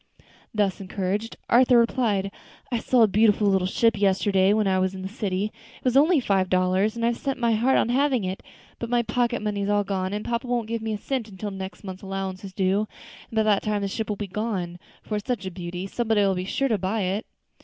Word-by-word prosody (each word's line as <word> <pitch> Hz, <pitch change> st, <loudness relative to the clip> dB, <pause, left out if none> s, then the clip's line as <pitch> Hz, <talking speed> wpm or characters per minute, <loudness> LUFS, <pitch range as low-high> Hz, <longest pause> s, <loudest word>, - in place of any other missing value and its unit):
Thus 205 Hz, -3 st, 0 dB
encouraged, 195 Hz, +3 st, -3 dB
Arthur 250 Hz, +1 st, +5 dB
replied, 225 Hz, -5 st, +1 dB, 0.4 s
"I 240 Hz, -, +1 dB
saw 240 Hz, +1 st, +4 dB
a -, -, +6 dB
beautiful 210 Hz, +1 st, +3 dB
little 190 Hz, -2 st, +3 dB
ship 230 Hz, +4 st, +2 dB
yesterday 195 Hz, 0 st, +3 dB
when 215 Hz, 0 st, +2 dB
I 190 Hz, -1 st, +2 dB
was 190 Hz, +1 st, 0 dB
in 190 Hz, -, -7 dB
the -, -, -3 dB
city; 205 Hz, -1 st, -2 dB, 0.3 s
it -, -, -24 dB
was 255 Hz, -1 st, +1 dB
only 305 Hz, +4 st, +5 dB
five 195 Hz, -6 st, +1 dB
dollars, 185 Hz, +4 st, +2 dB
and 230 Hz, 0 st, -1 dB
I've 235 Hz, 0 st, +1 dB
set 275 Hz, -2 st, -2 dB
my 235 Hz, -1 st, +1 dB
heart 235 Hz, +4 st, +3 dB
on -, -, +2 dB
having 260 Hz, -2 st, +2 dB
it, 185 Hz, +1 st, -3 dB, 0.4 s
but 235 Hz, -, -4 dB
my 240 Hz, 0 st, +2 dB
pocket 240 Hz, -1 st, 0 dB
money's 205 Hz, -1 st, -1 dB
all 205 Hz, 0 st, +3 dB
gone, 190 Hz, -1 st, -2 dB
and 210 Hz, +1 st, -4 dB
papa 235 Hz, +2 st, -2 dB
won't 240 Hz, -2 st, -1 dB
give 230 Hz, 0 st, -3 dB
me 220 Hz, -1 st, -2 dB
a -, -, -2 dB
cent 240 Hz, +1 st, -3 dB
until 205 Hz, +1 st, -6 dB
next 190 Hz, -1 st, -7 dB
month's 190 Hz, -1 st, -7 dB
allowance 195 Hz, 0 st, -4 dB
is 195 Hz, -, -7 dB
due; 195 Hz, +3 st, +1 dB, 0.4 s
and -, -, -10 dB
by 220 Hz, -, +3 dB
that 210 Hz, -2 st, +3 dB
time 210 Hz, -1 st, -1 dB
the -, -, 0 dB
ship 220 Hz, +3 st, -3 dB
will 210 Hz, -, 0 dB
be 205 Hz, -, -4 dB
gone, 190 Hz, -4 st, -3 dB, 0.2 s
for 210 Hz, -, -2 dB
it's 205 Hz, -, -7 dB
such 235 Hz, -7 st, -2 dB
a 190 Hz, -, -4 dB
beauty 175 Hz, +1 st, -5 dB
somebody'll 210 Hz, -2 st, +1 dB
be 180 Hz, 0 st, -3 dB
sure 275 Hz, +7 st, 0 dB
to 220 Hz, -5 st, +1 dB
buy 195 Hz, +4 st, -1 dB
it." 195 Hz, +4 st, -2 dB
205 Hz, 235 wpm, -25 LUFS, 190-230 Hz, 0.4 s, a